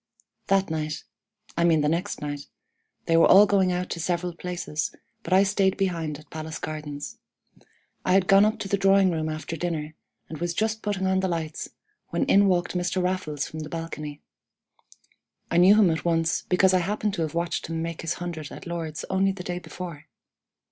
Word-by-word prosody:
"That 195 -3 +2
night 155 -1 -3 0.5
I 170 - +1
mean 165 -3 +4
the 150 - +1
next 170 +6 -1
night 145 -1 -5 0.6
they 165 - +2
were 165 - +7
all 200 +2 +8
going 195 -3 +3
out 180 0 -2
to 170 - -3
several 175 +1 -1
places, 175 -3 -4 0.3
but - - -8
I 190 +1 +6
stayed 195 -1 +2
behind 165 -6 -1
at 155 - -17
Palace 160 0 -5
Gardens. 150 -2 -6 0.8
I 185 - +2
had 190 -1 +4
gone 195 +1 +6
up 215 +1 +2
to - - -3
the 200 - +1
drawing 195 -1 +5
room 160 -1 -1
after 155 +1 -4
dinner, 155 -2 -3 0.3
and 155 - -7
was 170 0 -2
just 220 0 0
putting 200 -2 -1
on 190 0 +2
the 190 - 0
lights, 160 -3 -3 0.4
when - - 0
in 200 -7 +5
walked 180 -2 +1
Mr. 180 +1 -1
Raffles 180 -6 -1
from 155 - -7
the 155 -1 -6
balcony. 155 -3 -6 1.3
I 170 - +2
knew 185 +4 +7
him 205 -5 +5
at 160 - -2
once, 165 -1 +1
because 185 +1 +4
I 185 - +5
happened 210 +3 -1
to 180 - -2
have 160 0 -2
watched 170 0 -1
him 165 0 -3
make 165 -1 -4
his 165 0 -2
hundred 170 -4 -6
at - - -9
Lord's 165 -3 -4
only 190 +1 +3
the 185 -1 -8
day 180 0 -3
before. 175 -4 -8
175 Hz, 195 wpm, -26 LUFS, 160-190 Hz, 1.3 s, all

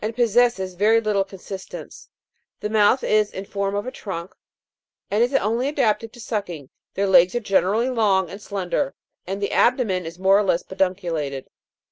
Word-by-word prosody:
possesses 235 -5 +2
very 215 +5 +3
little 210 -3 +1
consistence; 195 0 -9 0.5
the 210 - -4
mouth 220 +4 +4
is 215 -1 +2
in 190 - -6
form 200 0 -2
of 205 - -2
a 255 - -4
trunk, 190 -7 -7 0.8
and 210 +2 +2
is 245 - 0
only 235 +2 +1
adapted 230 -6 0
to 240 - -15
sucking; 180 - -5 0.2
their 200 - +1
legs 180 0 +5
are - - +2
generally 210 +2 +1
long 205 -7 +2
and 195 +5 -10
slender; 200 +8 -2 0.3
and 195 +1 -3
the - - -1
abdomen 230 -7 +2
is 165 +1 -8
more 190 +2 +4
or - - +2
less 180 -3 +1
pedunculated. 170 -8 -2
200 Hz, 165 wpm, -22 LUFS, 190-225 Hz, 0.8 s, legs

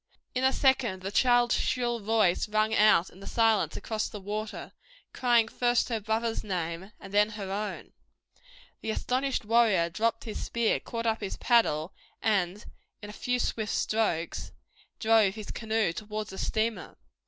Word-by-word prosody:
In 255 - -1
a 265 - +5
second 260 -9 +1
the 195 - -3
child's 245 0 +4
shrill 240 -2 0
voice 215 -3 +1
rang 215 +1 +1
out 210 -5 +4
in 185 - -16
the 195 - -10
silence 225 -3 +2
across 220 -1 -3
the 210 - -8
water, 210 +2 -5 0.4
crying 240 -3 +3
first 240 +2 +1
her 230 -2 -1
brother's 225 +2 -1
name, 180 0 -4
and 195 - -11
then 210 +1 +4
her 195 -2 -5
own. 205 +1 -4 0.9
The - - -4
astonished 255 +2 -1
warrior 210 -7 +3
dropped 225 +5 0
his 220 - -5
spear, 235 -1 +1
caught 230 0 -5
up 225 0 0
his 200 - -4
paddle 185 -9 +2 0.3
and 200 -1 0 0.4
in 205 - -7
a - - -12
few 250 +3 -1
swift 220 -3 -2
strokes 210 -7 -1 0.5
drove 220 -3 +3
his 215 -2 -7
canoe 220 -5 0
towards 210 +2 -5
the 190 - -8
steamer. 220 +1 -2
220 Hz, 160 wpm, -28 LUFS, 200-230 Hz, 0.9 s, a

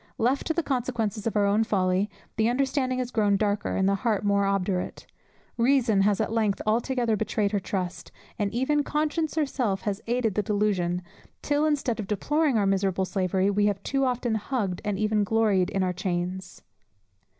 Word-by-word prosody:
Left 255 +5 +1
to 320 - +1
the 340 - 0
consequences 235 -6 -2
of 225 - -2
our 205 - +3
own 205 +2 +3
folly, 190 -1 +1 0.3
the 220 +1 +2
understanding 260 0 0
has 250 -1 -3
grown 205 -3 +2
darker, 205 0 -1
and 190 - +2
the 200 - +3
heart 220 -4 0
more 200 -1 +2
obdurate; 195 -2 -2 0.5
reason 235 -4 +3
has 200 0 +2
at 220 0 -1
length 215 -3 +1
altogether 235 +1 +1
betrayed 210 -1 -1
her 205 - +1
trust, 185 -1 -4 0.3
and 205 -1 0
even 265 +5 +1
conscience 310 +2 -1
herself 255 -10 0
has 205 -1 -3
aided 235 -3 +1
the 210 - +1
delusion, 195 -4 0 0.4
till, 295 +1 +1
instead 275 -6 0
of 205 - -4
deploring 285 - +1
our 205 - +2
miserable 195 -1 +1
slavery, 190 +1 0
we 205 +1 +2
have 200 -2 -2
too 275 0 0
often 245 -2 0
hugged, 210 -4 -2
and 205 -2 -1
even 215 0 +1
gloried 205 -3 +2
in 195 -1 0
our 180 -1 0
chains. 180 0 -4
210 Hz, 180 wpm, -26 LUFS, 195-245 Hz, 0.5 s, our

